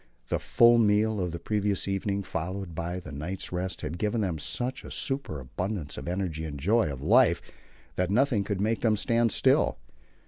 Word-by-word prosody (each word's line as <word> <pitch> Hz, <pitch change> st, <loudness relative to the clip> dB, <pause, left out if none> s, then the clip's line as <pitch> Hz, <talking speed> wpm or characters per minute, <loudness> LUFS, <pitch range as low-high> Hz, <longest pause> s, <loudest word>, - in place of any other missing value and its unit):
The -, -, 0 dB
full 120 Hz, 0 st, +5 dB
meal 105 Hz, 0 st, +3 dB
of 90 Hz, -2 st, -1 dB
the 85 Hz, -, -4 dB
previous 105 Hz, +1 st, -1 dB
evening, 100 Hz, 0 st, -1 dB
followed 95 Hz, +1 st, -4 dB
by 85 Hz, +3 st, -3 dB
the 75 Hz, -4 st, -10 dB
night's 75 Hz, +7 st, -4 dB
rest, 90 Hz, +1 st, -3 dB
had 80 Hz, +3 st, -5 dB
given 110 Hz, +2 st, 0 dB
them 90 Hz, -6 st, -1 dB
such 125 Hz, -, -2 dB
a -, -, -9 dB
superabundance 90 Hz, -, -3 dB
of -, -, -7 dB
energy 90 Hz, -3 st, -2 dB
and 75 Hz, -3 st, -5 dB
joy 95 Hz, +1 st, +2 dB
of 70 Hz, 0 st, -7 dB
life 110 Hz, -, +5 dB, 0.6 s
that 90 Hz, 0 st, +1 dB
nothing 120 Hz, -1 st, +2 dB
could 100 Hz, -1 st, -3 dB
make 110 Hz, +3 st, 0 dB
them 110 Hz, -2 st, +3 dB
stand 115 Hz, +1 st, +2 dB
still. -, -, +3 dB
95 Hz, 180 wpm, -28 LUFS, 85-110 Hz, 0.6 s, full